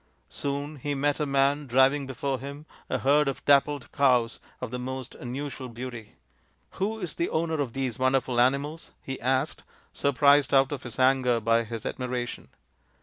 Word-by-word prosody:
Soon 145 +1 -3
he 145 +2 -3
met 145 +1 0
a 150 - 0
man 140 +1 +2
driving 135 +3 +3
before 135 0 -2
him 140 +2 -8 0.2
a - - 0
herd 145 +2 +3
of 135 - -3
dappled 145 -1 +3
cows 125 -4 +2 0.2
of 125 -2 -6
most 130 +1 -5
unusual 130 +1 -6
beauty. 120 -2 -8 0.3
" - - -41
Who 210 +3 0
is 180 -7 -4
the 170 - -1
owner 160 -1 0
of 125 -5 -3
these 130 -4 -3
wonderful 130 -2 +2
animals? 140 +5 0
" - - -41
he 135 -1 -6
asked, 130 +4 0 0.3
surprised 140 +1 +4
out 135 +1 +4
of 140 -3 -4
his 120 -3 -8
anger 130 -2 +3
by 115 +1 +2
his 115 -1 -6
admiration. 125 -1 -4
135 Hz, 170 wpm, -27 LUFS, 125-145 Hz, 0.3 s, surprised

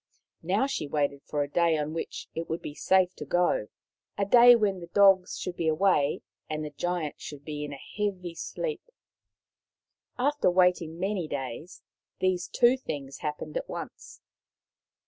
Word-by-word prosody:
Now 195 +9 +1
she 270 - -3
waited 140 -1 -1
for 145 -1 0
a - - -5
day 165 +2 +2
on 150 +1 -3
which 165 - -5
it 165 +1 -5
would 165 +1 -3
be 145 - -6
safe 185 +3 +2
to - - -5
go 175 -7 +1 0.2
— 90 - -56
a 200 - +1
day 240 +3 +8
when 205 -4 +1
the 170 - -9
dogs 195 0 +4
should 180 - -4
be 165 - -2
away 155 -3 +2 0.3
and 155 0 -3
the 150 - -6
Giant 170 0 -3
should 145 -1 -9
be 150 -1 -4
in 145 - -5
a 140 - -7
heavy 185 +2 -4
sleep. 455 - -4 1.4
After 290 0 +2
waiting 180 -3 +2
many 190 -3 -1
days, 140 +4 -6 0.3
these 185 -1 0
two 245 +2 +4
things 140 - -6
happened 150 - -5
at - - -5
once. - - -8
175 Hz, 165 wpm, -28 LUFS, 150-195 Hz, 1.4 s, day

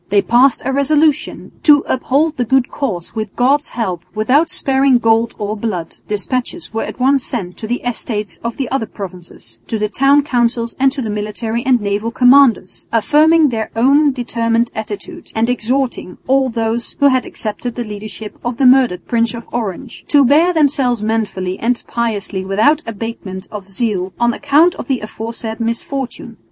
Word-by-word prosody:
They 200 0 +3
passed 250 +2 +3
a 270 - 0
resolution 295 +2 +1
"to 295 -2 +5
uphold 290 +5 0
the 250 - +1
good 255 +1 +2
cause 185 - -4
with 215 -3 -5
God's 280 +5 +2
help 185 -8 -3
without 260 +10 +2
sparing 270 -1 +3
gold 225 0 +1
or 210 0 -3
blood." 200 -7 -4
Despatches 250 - -3
were 225 - -1
at - - -6
once 270 +1 +3
sent 190 -10 -4
to 220 - -6
the 245 +2 -2
Estates 220 -4 -3
of 235 0 -4
the 270 - -2
other 245 -5 -1
provinces, 175 - -10
to 225 - -2
the 210 0 -1
town 275 +5 +3
councils 235 -3 0
and 270 0 +4
to 270 -1 -4
the 220 - -3
military 215 +3 -3
and 255 -2 +3
naval 205 +2 -2
commanders, 245 -5 +3
affirming 300 +7 +4
their 220 -3 -3
own 280 +5 +4
determined 230 -2 -1
attitude 220 - -7
and 230 +2 +1
exhorting 250 -3 -2
all 265 0 +2
those 230 0 -2
who 285 -1 +5
had 260 -1 +1
accepted 225 +2 -5
the 240 - -3
leadership 210 -1 -8
of 240 -1 -3
the 270 - +2
murdered 250 -9 +4
Prince 230 0 0
of 235 - -9
Orange 230 +1 -5
"to 285 -2 +5
bear 310 +7 +4
themselves 270 -8 +1
manfully 210 -4 -2
and 240 +1 -1
piously 210 -5 -2
without 220 +11 +2
abatement 210 -4 -6
of 200 -2 -8
zeal 195 -3 -2
on 240 0 +2
account 295 +6 +3
of - - -7
the 265 -3 -1
aforesaid 220 +1 -6
misfortune." 235 0 -4
235 Hz, 170 wpm, -17 LUFS, 215-270 Hz, -, to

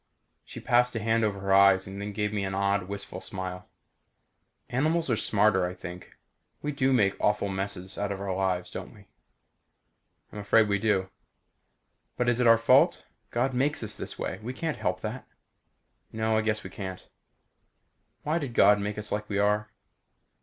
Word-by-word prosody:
She - - -9
passed 125 0 +2
a - - 0
hand 115 +1 +1
over 105 -2 0
her 95 0 +1
eyes 95 -1 +6
and 95 +1 -7
then 105 0 -4
gave 105 +1 -2
me 100 -2 -1
an 95 0 -3
odd 100 -1 0
wistful 100 0 -6
smile. 95 -1 -5 1.0
"Animals 155 +3 0
are - - +3
smarter, 105 -3 +2
I 90 - -7
think. 90 0 -10 0.5
We 150 - -1
do 135 -2 +1
make 100 -6 +3
awful 105 -1 +1
messes 95 -1 -4
out 100 0 -1
of 100 - -4
our 100 -2 -3
lives, 90 -2 -1
don't - - -7
we?" - - -17 1.3
"I'm 105 - -6
afraid 105 +2 +4
we 100 -1 +1
do." 95 -3 0 1.1
"But 120 0 +1
is 120 0 +1
it 125 - +3
our 115 0 +7
fault? 115 - +4 0.2
God 130 +3 0
makes 135 +2 0
us 105 -1 -2
this - - -7
way. 95 - -4
We 120 +4 -5
can't 160 +3 -3
help - - -2
that." - - -5 0.8
"No, 110 0 0
I 110 - +3
guess 110 -1 -1
we - - -8
can't." 95 -2 -7 1.2
"Why 155 +3 0
did 135 -7 -5
God 105 0 +6
make 105 +1 -3
us 105 0 -5
like 105 0 -3
we 100 - -1
are?" 105 +1 +1
105 Hz, 180 wpm, -28 LUFS, 95-115 Hz, 1.3 s, our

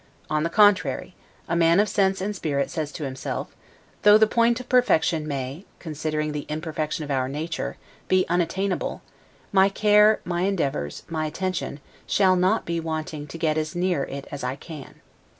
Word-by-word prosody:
On 155 0 +1
the 165 - 0
contrary, 205 -1 +3 0.3
a 170 - -1
man 170 +1 +4
of 210 - +4
sense 195 -2 +1
and 205 +2 -2
spirit 140 -6 -1
says 155 -2 -3
to 155 - -6
himself: 130 -1 -5 0.5
Though 210 0 +8
the 220 - +6
point 235 +2 +2
of 255 - -9
perfection 165 -11 +2
may 140 +3 -4
(considering 155 -1 -3
the 150 -1 -5
imperfection 155 0 -3
of 145 - -5
our 130 -1 0
nature) 160 +4 -4 0.3
be 185 0 +3
unattainable, 180 +3 -1 0.5
my 195 0 +5
care, 210 +1 +5
my 175 -1 -1
endeavors, 140 - -1
my 155 -2 -2
attention, 175 -3 -3 0.3
shall 190 -2 +4
not 185 +5 +2
be 170 0 -1
wanting 155 -2 -4
to 160 - -8
get 155 -1 +1
as 155 +2 -4
near 175 -5 +1
it 140 0 -7
as 145 -3 -6
I 125 +1 -2
can. 150 -2 -11
165 Hz, 170 wpm, -24 LUFS, 150-190 Hz, 0.5 s, Though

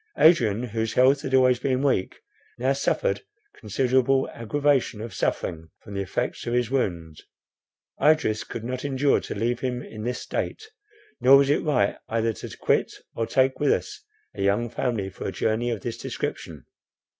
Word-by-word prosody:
Adrian, 120 - +4
whose 110 -2 -2
health 135 +2 +4
had 130 - 0
always 125 -1 +4
been 130 0 0
weak, 130 -9 +1 0.4
now 130 +3 +1
suffered 485 - 0 0.3
considerable 130 +4 +1
aggravation 135 0 0
of 110 -1 -6
suffering 80 -3 -2
from 100 - -10
the 100 - -2
effects 120 +6 -3
of 120 - 0
his 125 -1 0
wound. 85 - -2 0.8
Idris 145 -8 +3
could 115 - -7
not 125 +2 -4
endure 140 0 +2
to - - -6
leave 120 +3 0
him 125 -1 -3
in 110 - -9
this 125 +2 -2
state; 435 0 -4 0.5
nor 135 +2 +7
was 140 0 +3
it 145 - +2
right 125 -10 +1
either 115 0 0
to - - -9
quit - - +1 0.2
or 115 - -2
take 130 0 +2
with 145 - +3
us - - -2 0.3
a - - -6
young 100 +4 +1
family 115 -6 -1
for - - -6
a - - -2
journey 110 +2 0
of 115 -5 -3
this 115 +1 -5
description. - - -5
125 Hz, 170 wpm, -25 LUFS, 110-135 Hz, 0.8 s, nor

